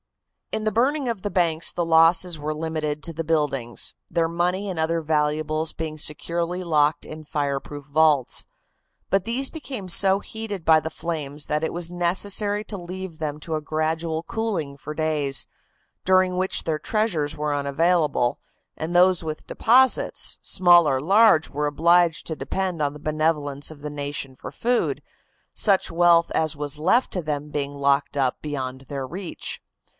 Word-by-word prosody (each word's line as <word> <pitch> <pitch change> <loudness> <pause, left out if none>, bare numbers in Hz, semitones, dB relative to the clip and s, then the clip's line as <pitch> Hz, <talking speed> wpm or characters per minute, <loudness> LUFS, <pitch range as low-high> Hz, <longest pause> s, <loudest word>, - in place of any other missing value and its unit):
In 215 - -2
the 215 - +2
burning 265 +6 +1
of 230 -5 -2
the 205 - -2
banks 170 -4 +1
the 175 - -2
losses 165 +1 +4
were 155 +1 -3
limited 155 -2 -3
to 165 - -3
the 165 +1 -3
buildings, 145 -7 -1 0.2
their 165 -1 +1
money 180 +4 -1
and 185 -3 -4
other 165 +1 +1
valuables 155 0 0
being 155 -1 -5
securely 170 +4 -1
locked 155 -2 +2
in 155 0 -9
fireproof 145 -1 -3
vaults. 145 -3 +2 0.6
But 195 -1 +2
these 250 +6 0
became 265 - -7
so 190 +2 +5
heated 210 -4 -7
by 160 -1 +6
the 160 - -4
flames 150 -4 -4
that 150 +1 -1
it 160 - -1
was 175 0 -3
necessary 200 +4 0
to 205 - -5
leave 180 -1 -7
them 150 -1 -3
to 160 +1 -3
a 155 - -2
gradual 160 +1 -2
cooling 180 -10 -3
for 150 +2 -7
days, 150 -3 -1 0.6
during 185 0 +3
which 185 +1 0
their 155 -2 -1
treasures 170 -7 -1
were 150 0 -1
unavailable, 145 -2 +1 0.4
and 160 +2 -4
those 180 -1 +4
with 155 -1 -6
deposits, 255 +3 +3
small 175 -4 +5
or 130 - +1
large, 195 +1 +5
were 150 +1 -2
obliged 170 +3 +3
to 160 - -3
depend 185 -1 -3
on 145 -1 +1
the 150 - -11
benevolence 150 -2 -1
of 150 -2 -13
the 150 0 -5
nation 145 -2 -4
for - - -9
food, 245 +1 0 0.5
such 195 -5 +2
wealth 170 0 +4
as 155 -1 0
was 145 0 -2
left 210 +11 +2
to 180 - -1
them 150 -1 -4
being 145 -1 -3
locked 140 +1 +1
up 130 -2 0
beyond 130 -3 -4
their 135 -2 -4
reach. 180 +3 -4
160 Hz, 165 wpm, -24 LUFS, 150-180 Hz, 0.6 s, by